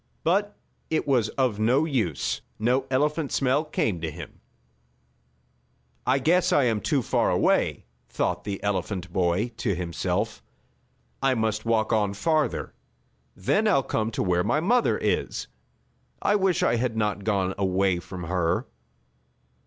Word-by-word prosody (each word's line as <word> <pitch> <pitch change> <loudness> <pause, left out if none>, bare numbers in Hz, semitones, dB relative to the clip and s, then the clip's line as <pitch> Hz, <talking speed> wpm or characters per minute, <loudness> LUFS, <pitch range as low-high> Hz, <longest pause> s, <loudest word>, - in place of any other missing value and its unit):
But 200 +5 +1 0.3
it 160 - 0
was 120 -6 +2
of 125 -6 +1
no 125 +8 +3
use. 115 - -1 0.2
No 125 +4 +1
elephant 150 +3 0
smell 135 +3 +2
came 110 - -1
to 80 - -2
him. 75 - -10 1.7
"I 130 - +4
guess 175 +6 +2
I 145 - +4
am 115 -4 +1
too 140 -6 +1
far - - +1
away," - - +1 0.2
thought - - -1
the 100 -1 -5
elephant 95 -2 -2
boy 90 +5 +1
to 100 -6 -1
himself. 90 +4 -2 0.8
"I 135 -1 +3
must 110 -1 -1
walk 115 0 +2
on 105 -2 +1
farther. 155 +6 0 0.6
Then 205 - +1
I'll 160 -10 +3
come 110 -3 -1
to - - -1
where 90 -2 +1
my 150 - +1
mother 235 +9 +2
is. - - -1 0.7
I 205 - +2
wish 190 -4 +2
I 120 - +3
had 115 -1 -1
not 105 -2 -1
gone 95 -3 0
away 95 -1 +1
from 90 +1 -8
her." 85 0 0
110 Hz, 145 wpm, -26 LUFS, 95-140 Hz, 1.7 s, I